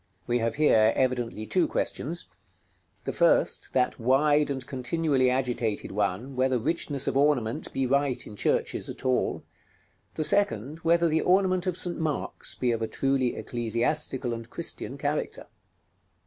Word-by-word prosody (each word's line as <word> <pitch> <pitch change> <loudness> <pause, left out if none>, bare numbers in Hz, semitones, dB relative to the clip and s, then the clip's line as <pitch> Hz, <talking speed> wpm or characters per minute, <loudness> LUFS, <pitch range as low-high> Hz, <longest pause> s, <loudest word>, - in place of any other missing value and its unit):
We 120 0 0
have 115 0 -1
here 110 -7 +4
evidently 120 -4 -1
two 175 +7 +1
questions: 170 +5 -2 0.8
the - - -3
first, - - +2
that 125 0 +1
wide 145 +5 +3
and 130 -2 -3
continually 135 0 0
agitated 125 -4 -1
one, 105 +6 -2
whether 130 0 +2
richness 140 +1 -1
of - - 0
ornament 140 -1 +1
be 135 - -1
right 135 -1 0
in 105 - -10
churches - - -1
at - - -8
all; 130 -1 0 0.7
the 155 - -1
second, 155 - +2
whether 170 +1 +3
the 160 0 +1
ornament 185 -1 +2
of 180 -1 0
St. 175 -1 +4
Mark's 155 -3 -3
be 125 -1 0
of 115 -1 -2
a 110 - -1
truly 135 -1 0
ecclesiastical 120 +3 -1
and 115 0 -7
Christian - - -6
character. - - -3
130 Hz, 150 wpm, -27 LUFS, 120-155 Hz, 0.8 s, here